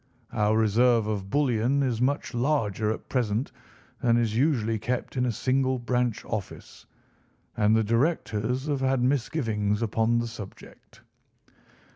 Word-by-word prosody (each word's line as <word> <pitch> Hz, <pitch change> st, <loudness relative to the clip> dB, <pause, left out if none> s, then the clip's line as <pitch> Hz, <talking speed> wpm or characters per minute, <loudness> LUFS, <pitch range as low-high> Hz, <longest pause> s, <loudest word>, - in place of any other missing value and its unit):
Our 105 Hz, 0 st, +2 dB
reserve 115 Hz, +1 st, +3 dB
of 100 Hz, -3 st, -3 dB
bullion 135 Hz, +1 st, +1 dB
is 120 Hz, -3 st, -1 dB
much 140 Hz, +2 st, 0 dB
larger 120 Hz, -5 st, 0 dB
at 110 Hz, -, -4 dB
present 120 Hz, -1 st, -1 dB, 0.5 s
than 120 Hz, -1 st, +3 dB
is 115 Hz, -2 st, 0 dB
usually 115 Hz, -5 st, +1 dB
kept 120 Hz, +5 st, -3 dB
in 125 Hz, -1 st, +1 dB
a -, -, +1 dB
single 130 Hz, +3 st, 0 dB
branch 120 Hz, -1 st, -1 dB
office, 105 Hz, -4 st, -7 dB, 0.7 s
and 105 Hz, +1 st, +3 dB
the 110 Hz, -, +3 dB
directors 120 Hz, 0 st, 0 dB
have 145 Hz, -3 st, -1 dB
had 130 Hz, -1 st, +1 dB
misgivings 115 Hz, -6 st, 0 dB
upon 115 Hz, +1 st, +1 dB
the 120 Hz, -, 0 dB
subject." 110 Hz, -4 st, -12 dB
120 Hz, 135 wpm, -26 LUFS, 110-130 Hz, 0.7 s, reserve